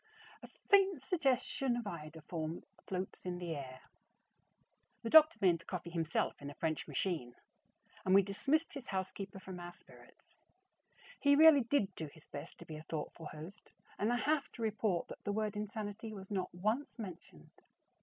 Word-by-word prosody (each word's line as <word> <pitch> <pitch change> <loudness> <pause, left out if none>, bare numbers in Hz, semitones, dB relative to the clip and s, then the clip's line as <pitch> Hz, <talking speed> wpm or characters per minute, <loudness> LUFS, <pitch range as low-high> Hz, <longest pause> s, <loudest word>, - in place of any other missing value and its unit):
A - - -10 0.2
faint 390 -5 +5
suggestion 265 -4 +1
of 240 - -2
iodoform 160 -1 -5 0.2
floats 185 0 -4
in 180 -1 -3
the 175 -2 -3
air. 130 -2 -7 1.2
The 230 - -3
doctor 315 +1 +9
made 175 -4 +4
the 170 - -17
coffee 175 -2 -5
himself 165 -3 -1
in 140 - -5
a 145 - -9
French 160 -2 -1
machine, 155 -11 -2 0.7
and 185 - +4
we 200 - +8
dismissed 275 - 0
his 275 -3 -7
housekeeper 190 0 -4
from 190 -1 -8
our 175 0 -7
spirits. - - -19 0.9
He 285 0 +5
really 310 -1 +9
did 230 -5 +1
do 160 -3 -5
his 155 +2 -16
best - - -8
to - - -11
be 155 - -7
a 155 - -9
thoughtful 160 0 -4
host 160 +8 -10 0.3
and 215 +3 +2
I 245 - +2
have 295 +2 +1
to 230 - -5
report 215 -4 0
that - - -9
the 205 - -1
word 215 0 -1
"insanity" 210 +1 -4
was 195 0 -9
not 185 -3 -1
once 215 +12 -1
mentioned. 175 - -10
195 Hz, 170 wpm, -35 LUFS, 170-235 Hz, 1.2 s, doctor